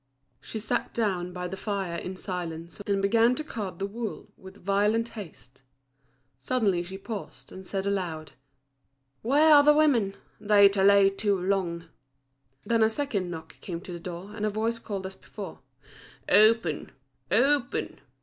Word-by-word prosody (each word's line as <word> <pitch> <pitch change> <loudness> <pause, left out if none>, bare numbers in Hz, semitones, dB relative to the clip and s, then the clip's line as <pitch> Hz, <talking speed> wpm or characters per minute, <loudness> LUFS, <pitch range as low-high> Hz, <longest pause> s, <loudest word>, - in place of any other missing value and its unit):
She - - -7
sat 215 0 -2
down 185 -6 0
by 180 0 -4
the 185 - -5
fire 195 -3 -3
in 185 +2 -5
silence, 170 -1 -5
and 200 -1 +1
began 230 +4 +4
to 310 - -4
card 205 - -5
the 195 - -2
wool 220 +2 -6
with 190 -1 -14
violent 210 +4 +2
haste. 155 - -11 0.8
Suddenly 200 - +1
she 190 +2 -7
paused, 205 +1 -8
and 190 -1 -10
said 195 -1 -3
aloud: 175 -6 -2 0.9
"Where 295 +6 +5
are 290 - +9
the 295 +1 +5
women? 245 -11 +3 0.2
they 205 -1 +6
delay 200 0 +5
too 200 -1 0
long." 180 -3 -1 0.8
Then 230 -1 +2
a 220 - +5
second 220 -7 -2
knock 160 -2 -9
came 170 -3 -5
to 180 - -8
the 170 - -6
door, 180 +3 -7
and 210 - -5
a 215 - +2
voice 225 +2 -1
called 200 -4 -5
as 190 - -5
before, - - -9 0.7
"Open! 215 -6 +4 0.4
open!" 245 +5 +1
200 Hz, 155 wpm, -27 LUFS, 180-225 Hz, 0.9 s, are